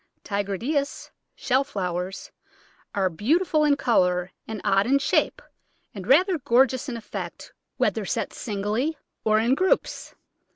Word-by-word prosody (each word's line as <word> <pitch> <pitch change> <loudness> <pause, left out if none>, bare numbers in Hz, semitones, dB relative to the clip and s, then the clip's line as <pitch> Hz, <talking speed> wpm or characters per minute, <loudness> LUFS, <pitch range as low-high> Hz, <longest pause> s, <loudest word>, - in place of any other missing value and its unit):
Tigridias 215 - -2 0.2
(Shell 265 +1 +1
Flowers) 180 -5 -4 0.6
are 195 -2 +2
beautiful 305 - +1
in 295 -1 +4
colour, 180 -8 +2 0.2
and 220 -1 -5
odd 195 +1 +3
in 275 +2 +4
shape, 390 - +1 0.5
and 195 -2 -8
rather 350 - +4
gorgeous 260 +1 +2
in 235 - -4
effect 225 - -7 0.2
whether - - +1
set - - -2
singly 220 +8 -2 0.3
or 215 -1 +3
in 230 +4 +3
groups. 370 +7 0
235 Hz, 125 wpm, -25 LUFS, 200-280 Hz, 0.6 s, in